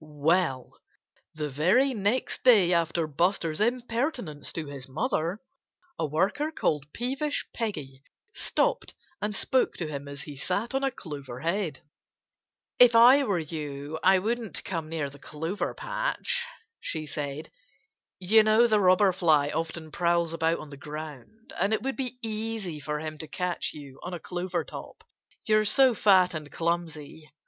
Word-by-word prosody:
Well, 150 -2 0 0.6
the 150 -1 -2
very 190 - +3
next 210 +3 -1
day 205 -8 +6
after 170 -1 +1
Buster's 165 +2 0
impertinence 235 - -1
to 165 - -4
his 140 -2 -8
mother 180 - -1 0.6
a - - 0
worker 195 - 0
called 150 - -1
Peevish 275 +5 -2
Peggy 150 - -4 0.3
stopped - - 0 0.3
and 210 0 -1
spoke 260 +6 +1
to 170 - -3
him 140 -2 -6
as 140 0 -6
he 145 - -9
sat 200 - -2
on 270 +1 0
a 270 - +3
clover 140 - -8
head. 170 -3 -1 1.0
"If 245 -1 +8
I 250 +5 +8
were 200 -6 +1
you 150 -1 -5
I 190 +1 +6
wouldn't 225 +3 -2
come 165 -4 -3
near 160 -3 -2
the 140 - -14
clover 160 +7 -4
patch," - - -2 0.3
she 155 -1 -4
said. 145 +1 -5 0.7
"You 210 +4 +5
know 215 +2 +5
the 215 -3 +3
Robber 185 +1 +5
Fly 155 -6 +3
often 160 0 -4
prowls 170 -1 +1
about 165 0 +1
on 150 - -10
the 140 - -9
ground. 150 - -9
And 200 +4 +2
it 220 - 0
would 270 0 -2
be 255 -2 -4
easy 215 -6 -3
for 150 +1 -3
him 155 -1 -6
to 160 - -6
catch 180 +2 -2
you 140 -3 -11
on 180 - -5
a - - -6
clover 180 +1 -3
top, - - -10 0.4
you're 215 0 +4
so 260 +4 +5
fat 190 -4 +4
and 150 -2 -6
clumsy.... 160 -2 -3
175 Hz, 155 wpm, -27 LUFS, 155-220 Hz, 1.0 s, If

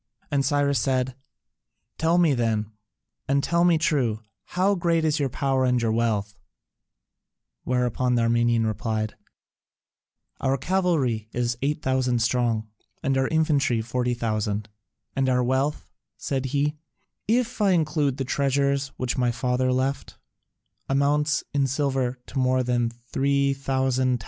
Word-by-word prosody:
And 140 -1 +2
Cyrus 140 0 +2
said, 130 -1 0 0.9
"Tell 165 +2 +3
me 170 -5 +4
then, 110 -3 0 0.6
and 140 0 +2
tell 170 0 +2
me 175 -2 +4
true: 135 -9 +1 0.3
how 190 +3 +1
great 170 -3 +1
is 155 0 +1
your 140 -2 0
power 135 0 0
and 125 -1 +2
your 115 -2 0
wealth?" 105 -3 -1 1.3
Whereupon 125 0 +1
the 120 - +2
Armenian 115 0 +2
replied: 110 0 -2 1.2
"Our 135 0 +1
cavalry 140 - 0
is 120 -1 0
8000 130 -3 0
strong 115 -2 0 0.4
and 135 0 +1
our 130 0 +2
infantry 150 -7 +2
40,000; 110 -3 -1 0.5
and 135 -1 +1
our 125 -1 +2
wealth," 135 +4 -1 0.3
said 135 -1 -2
he, 145 +3 0 0.5
"if 235 +1 0
I 205 - +4
include 150 -6 +1
the 135 - -2
treasures 140 +1 +1
which 130 +1 -2
my 125 -1 +2
father 125 +1 0
left, 130 +2 -2 0.7
amounts 145 +2 +2
in 140 -1 +2
silver 130 -2 -1
to 135 - -4
more 130 0 +2
than 120 -1 +1
3000 135 +1 0
talents." 125 -1 +1
130 Hz, 130 wpm, -25 LUFS, 120-140 Hz, 1.3 s, me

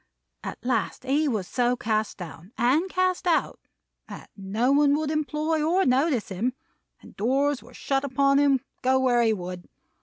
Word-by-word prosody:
At - - -5
last 245 -1 -1
he 285 +4 +1
was 215 -9 -2
so 245 0 +1
cast 220 -2 -1
down, 175 +2 -10
and 280 +10 +2
cast 370 0 0
out, 335 -2 +1 0.5
that - - -10
no 210 +6 0
one 285 0 +4
would 305 0 -1
employ 305 +1 -1
or 360 +5 +2
notice 260 -2 +1
him; 215 +7 -1 0.5
and - - -15
doors 270 +5 +1
were - - -16
shut 270 0 -1
upon 275 +1 +2
him, 275 -3 +3 0.2
go 260 0 +3
where 250 -2 +3
he 225 -1 +3
would. 180 -3 -5
260 Hz, 170 wpm, -25 LUFS, 225-295 Hz, 0.5 s, one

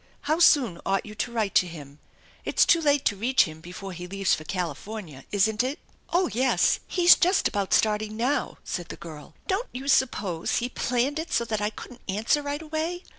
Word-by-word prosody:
How 310 +3 0
soon 260 - +4
ought 195 -1 0
you 210 - -9
to 225 +3 -3
write 220 -4 -1
to 180 - +4
him? 150 -4 -11 0.4
It's - - +3
too 335 - +4
late 290 -3 +2
to 205 - +2
reach 240 +6 +3
him 160 -1 -8
before 185 +3 -8
he 180 +1 -7
leaves 195 0 0
for 155 - -1
California, 175 -2 -5
isn't 210 +2 +2
it? 265 +4 -2 0.2
" - - -37
"Oh, 355 +1 +2
yes, 255 +2 +2
he's 355 -1 +6
just 365 +3 +2
about 200 -2 -2
starting 215 0 +1
now," 255 +5 -1
said 175 -2 -5
the - - -6
girl. 155 -2 -11
* - - -32
e - - -37
Don't 405 +6 -1
you 260 +2 -6
suppose 215 -11 +1
he 245 +1 -1
planned 255 +4 -1
it 330 +1 -5
so 235 - +1
that 215 -2 -2
I 210 - +1
couldn't 240 +3 -11
answer 220 +9 +1
right 290 +2 -4
away? 320 +3 -3
220 Hz, 215 wpm, -26 LUFS, 185-285 Hz, 0.4 s, he's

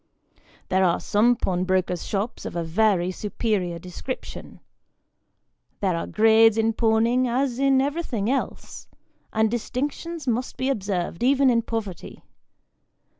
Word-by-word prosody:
There 190 0 +2
are 175 -2 +2
some 230 +4 +3
pawnbrokers' 185 -3 -1
shops 205 +3 -3
of - - -6
a 170 - -1
very 185 +1 +1
superior 200 -3 -2
description. 180 +9 -8 1.2
There 190 -4 0
are 165 - -3
grades 225 0 +5
in 225 0 +2
pawning 230 +3 +2
as 250 +1 -1
in 275 -1 +4
everything 275 -7 -1
else, 270 +3 -3 0.4
and 220 0 +1
distinctions 290 +6 -4
must 245 +2 -1
bo 260 +1 0
observed 190 -6 -3
even 265 +1 +4
in 230 -1 +2
poverty. 220 -6 -6
225 Hz, 125 wpm, -24 LUFS, 190-250 Hz, 1.2 s, grades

